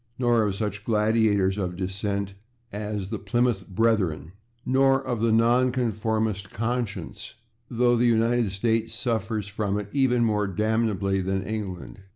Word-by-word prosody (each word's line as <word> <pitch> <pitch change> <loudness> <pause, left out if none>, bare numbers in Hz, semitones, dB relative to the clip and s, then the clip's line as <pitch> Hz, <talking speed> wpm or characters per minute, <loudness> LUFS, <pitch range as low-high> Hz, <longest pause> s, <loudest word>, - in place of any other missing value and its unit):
Nor 120 -2 +3
of 105 -3 0
such 105 0 -3
gladiators 105 -3 +2
of 90 -2 -2
dissent 100 +1 -3 0.4
as 105 -1 -4
the 110 - -3
/Plymouth 120 -3 0
Brethren/, 95 -6 0 0.3
nor 135 +1 +3
of 120 -4 -3
the 115 - +2
/nonconformist 110 -3 +1
conscience/, 115 -5 -4 0.3
though 120 0 +2
the 120 +1 +3
United 115 -1 +2
States 110 +3 -1
suffers 110 -3 -2
from 100 0 -2
it 105 -1 -5
even 125 -4 +3
more 105 -2 +1
damnably 105 -1 0
than 95 +1 -1
England. 100 -3 -5
110 Hz, 135 wpm, -25 LUFS, 100-115 Hz, 0.4 s, Nor